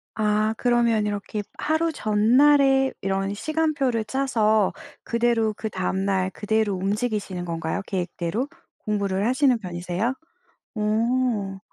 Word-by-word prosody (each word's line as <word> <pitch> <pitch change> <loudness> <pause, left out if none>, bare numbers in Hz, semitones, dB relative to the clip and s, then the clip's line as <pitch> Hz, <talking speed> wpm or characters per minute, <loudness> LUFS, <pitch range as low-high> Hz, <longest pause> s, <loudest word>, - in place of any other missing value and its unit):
아 215 0 +1
그러면 235 -3 +2
이렇게 205 +1 -3 0.2
하루 320 +1 0
전날에 270 +4 +4
이런 195 +1 -1
시간표를 290 -3 0
짜서 220 -5 +2 0.3
그대로 235 -2 +1
그 220 - -3
다음 190 +1 -1
날 190 -1 +1
그대로 215 0 0
움직이시는 200 -2 -2
건가요 165 +3 -3
계획대로? 185 +5 -2 0.4
공부를 200 -2 0
하시는 255 +1 +3
편이세요? 180 +5 -2 0.6
오. 215 -2 0
215 Hz, 270 characters per minute, -24 LUFS, 195-245 Hz, 0.6 s, 전날에